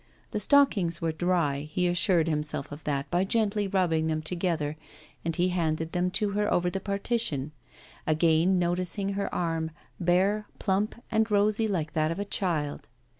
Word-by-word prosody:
The 210 - -1
stockings 210 - +3
were 165 -1 0
dry, 160 -4 +1
he 180 +2 +1
assured 175 -1 +3
himself 150 -2 -2
of 145 +2 -9
that 140 -2 -1
by 175 +1 +2
gently 210 0 +1
rubbing 175 -5 +1
them 155 -1 -1
together, 165 -4 -1 0.5
and 165 -1 -2
he 180 +1 +2
handed 160 -2 -1
them 180 0 0
to 200 +2 0
her 210 +1 0
over 175 0 +2
the 195 - -2
partition; 200 - -1 0.6
again 160 +3 +3
noticing 180 +2 0
her 200 0 -2
arm, 165 -2 -1 0.3
bare, 190 +4 +2
plump 200 +1 0 0.2
and 220 0 +2
rosy 210 +2 +3
like 165 -7 -2
that 155 0 +1
of 165 - -3
a 205 - -2
child. 160 -8 -2
180 Hz, 165 wpm, -28 LUFS, 160-200 Hz, 0.6 s, stockings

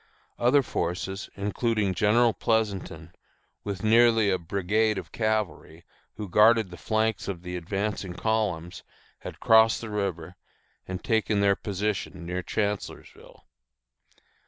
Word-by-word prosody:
Other 130 +4 +4
forces, 95 -1 -3
including 105 0 -1
General 110 +4 +3
Pleasonton, 95 -8 -2 0.5
with 100 -1 -5
nearly 115 -1 +4
a 95 - 0
brigade 100 +5 0
of - - -7
cavalry, 105 -7 -2 0.3
who 105 -1 -6
guarded 105 +1 +4
the - - -8
flanks 110 0 -1
of 90 -3 -5
the 90 0 -5
advancing 95 +1 -3
columns, 90 -7 -2 0.4
had - - -9
crossed 110 -1 +5
the 110 -2 -7
river, 90 -5 -3 0.5
and 95 0 -5
taken 110 -2 +1
their 100 0 +3
position 100 -3 -3
near 90 +1 -3
Chancellorsville. 105 +2 -5
100 Hz, 120 wpm, -26 LUFS, 90-110 Hz, 0.5 s, crossed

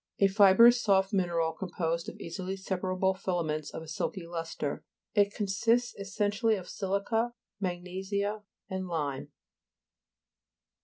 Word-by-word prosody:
A 200 - +4
fibrous 205 +5 +7
soft 195 -2 +3
mineral, 170 -4 +1
composed 170 -2 -2
of - - -12
easily 185 +3 -4
separable 190 0 0
filaments 170 -5 -2
of 160 - -7
a - - -12
silky 170 +4 -3
lustre. 165 -4 -4 0.3
It 205 -2 +4
consists 225 +4 +1
essentially 205 +3 0
of 185 -3 -6
si'lica, 205 +5 -1 0.3
mag 175 -3 -2
nesia 200 +3 -2 0.3
and 190 0 -4
lime. 145 -6 -3
190 Hz, 120 wpm, -30 LUFS, 175-205 Hz, 0.3 s, fibrous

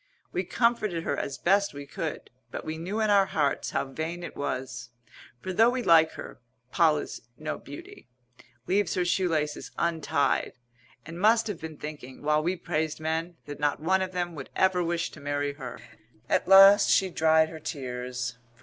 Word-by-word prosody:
We 180 - -1
comforted 215 -4 0
her - - -1
as 140 - -4
best 200 -2 +2
we 145 0 -7
could; - - -5 0.2
but - - -7
we 160 0 -4
knew 190 +6 -3
in 215 -1 +2
our 200 -1 +5
hearts 145 -3 0
how - - -1
vain 160 +6 -5
it - - -7
was. 130 -3 -4 0.5
For 185 - -4
though 225 +5 +5
we 250 0 -2
like 160 -3 +5
her, - - -9 0.3
Poll 160 -3 +4
is - - -6 0.2
no 155 0 -4
beauty; 145 -3 -11 0.6
leaves 195 +3 +1
her 180 -1 +1
shoe 180 +1 +1
laces 150 -2 -2
untied; 160 -4 0 0.5
and 170 +3 -8
must 225 +2 +4
have 205 -7 -5
been 160 -1 -7
thinking, 145 -4 -9
while 150 +1 +2
we 175 +4 0
praised 155 -3 -2
men, 165 +2 -3
that 145 0 -8
not 145 -1 0
one 190 +4 +2
of 185 -1 -2
them 175 -1 -2
would 140 -4 -8
ever 190 -1 +2
wish 170 0 -1
to - - -12
marry 145 0 -2
her. 135 -4 -8 0.5
At - - +1
last 195 +2 +8
she 190 -1 +3
dried 160 -1 +3
her 160 - -9
tears. 125 -5 -5
160 Hz, 185 wpm, -27 LUFS, 145-185 Hz, 0.6 s, last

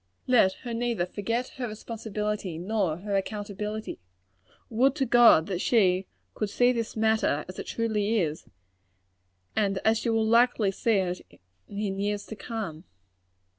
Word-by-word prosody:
Let 225 -7 +4
her 240 - -3
neither 230 -6 0
forget 230 +7 -2
her 250 -2 -2
responsibility 210 -4 -4
nor 185 -3 -1
her 200 +2 -3
accountability. 210 +1 -4 0.7
Would 260 +4 +2
to 275 -3 0
God 235 -9 +6
that 185 -1 -3
she 190 -5 +3 0.3
could 210 - -2
see 245 +4 +3
this 230 -2 -3
matter 220 -9 +1
as 185 - -8
it - - -6
truly 220 -1 0
is, 155 -4 -2 1.1
and 200 -2 +1
as 220 0 +4
she 235 - -2
will 225 -1 +2
be - - 0
likely 235 -4 +4
to - - -16
see 230 -2 +2
it 180 -2 -1 0.5
in 200 -1 -3
years 205 0 -1
to 220 - -8
come! 200 -8 -6
210 Hz, 155 wpm, -27 LUFS, 195-230 Hz, 1.1 s, God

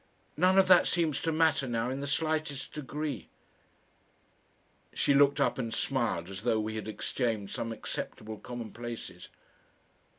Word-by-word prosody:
"None 185 +4 +4
of 190 -1 +6
that 180 -1 +7
seems 165 -5 +1
to 165 - 0
matter 160 -4 +2
now 120 +1 -1
in 135 - -3
the 140 - -4
slightest 155 -1 -1
degree." 145 - -4 1.7
She 140 - +3
looked 140 0 +5
up - - +2
and 115 -3 -2
smiled 115 -10 -1
as 95 0 -7
though 115 -1 +2
we 110 0 -2
had 110 -1 -5
exchanged 110 -1 -2
some 115 - -3
acceptable 110 -1 -5
commonplaces. 120 -1 -7
130 Hz, 140 wpm, -30 LUFS, 115-150 Hz, 1.7 s, that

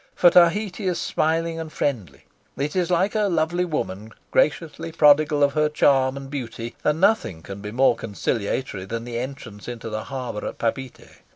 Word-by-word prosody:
For 175 - +6
Tahiti 190 +3 +3
is 180 - 0
smiling 165 +1 0
and 160 -1 -6
friendly; 100 - -3 0.3
it 145 +4 -2
is 180 -1 +1
like 180 +3 +2
a 215 -1 +1
lovely 175 +1 +1
woman 110 - -4 0.2
graciously 165 +1 0
prodigal 150 -1 +4
of 140 0 +3
her 150 0 +2
charm 135 -3 +3
and 135 0 -7
beauty; 120 -4 -6
and 150 +1 +1
nothing 190 - +2
can 100 0 -8
be 105 0 -6
more 125 +1 +3
conciliatory 105 -1 -3
than 115 +3 -4
the 120 -1 -4
entrance 120 -5 -7
into 115 -2 -6
the 110 0 -4
harbour 125 -5 -5
at - - -6
Papeete. 130 +2 -4
140 Hz, 175 wpm, -23 LUFS, 115-165 Hz, 0.3 s, For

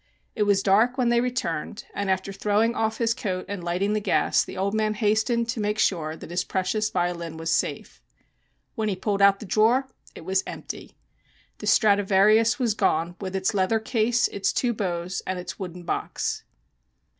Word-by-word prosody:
It 210 -3 0
was 195 -1 +3
dark 220 +6 +3
when 250 -2 +2
they 235 0 +3
returned, 225 -9 -3
and 200 -1 -2
after 190 +1 -1
throwing 210 +4 +1
off 220 -1 -1
his 230 -1 +1
coat 185 -5 -3
and 200 -3 -5
lighting 180 +4 0
the 215 - +1
gas 205 - +2
the - - -9
old 195 +2 -1
man 215 0 0
hastened 220 +2 +1
to 230 - -2
make 210 0 -1
sure 160 -7 0
that 160 - -11
his 175 +1 0
precious 215 +4 -1
violin 175 -4 -2
was 165 0 -1
safe. - - -2 0.7
When 220 -3 -1
he 195 - -1
pulled 200 +1 -1
out 200 0 +6
the - - -8
drawer 225 +7 +3 0.3
it - - -10
was 190 +1 +1
empty. - - -8 0.6
The - - -6
Stradivarius 210 +2 +4
was 240 -5 +1
gone, 175 -5 0
with 190 -1 -4
its 190 0 0
leather 200 +3 +2
case, 230 +1 +1
its 200 - -1
two 245 -2 0
bows 180 -3 -3
and 185 - -2
its 180 - -7
wooden 180 -2 -7
box. 170 - -3
200 Hz, 185 wpm, -25 LUFS, 185-220 Hz, 0.7 s, out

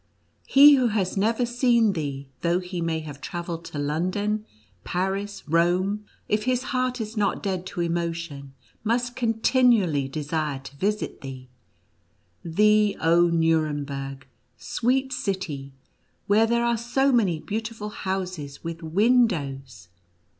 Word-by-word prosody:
He 285 +2 +8
who 255 -2 +3
has 205 -4 -1
never 225 +5 +1
seen 235 -3 +3
thee, 140 -4 -4
though 170 +1 +2
he 180 -1 -4
may 165 -1 -1
have 145 -2 -9
travelled 170 0 -5
to - - -7
London, 185 +9 -1 0.4
Paris, 195 +3 -3
Rome, 180 +6 +1 0.2
if 210 +1 0
his 255 -1 +1
heart 255 0 0
is 220 0 -5
not 205 -2 0
dead 185 -2 -2
to 175 - -4
emotion, 170 -5 -3 0.3
must 240 +2 0
continually 225 - +2
desire 150 0 -2
to 135 +1 -11
visit 210 +6 -2
thee 130 -2 -8 0.5
— 85 0 -42
thee, 210 +4 +3
oh 170 +2 +4
Nuremberg, 145 -5 -1 0.3
sweet 265 +2 0
city, 185 - -3 0.5
where 215 +2 +4
there 235 +1 +1
are 235 -1 +2
so 265 +4 +1
many 200 -10 +2
beautiful 220 +2 -4
houses 185 -8 -4
with 165 0 -5
windows!" 160 - +1
185 Hz, 130 wpm, -25 LUFS, 155-225 Hz, 0.5 s, He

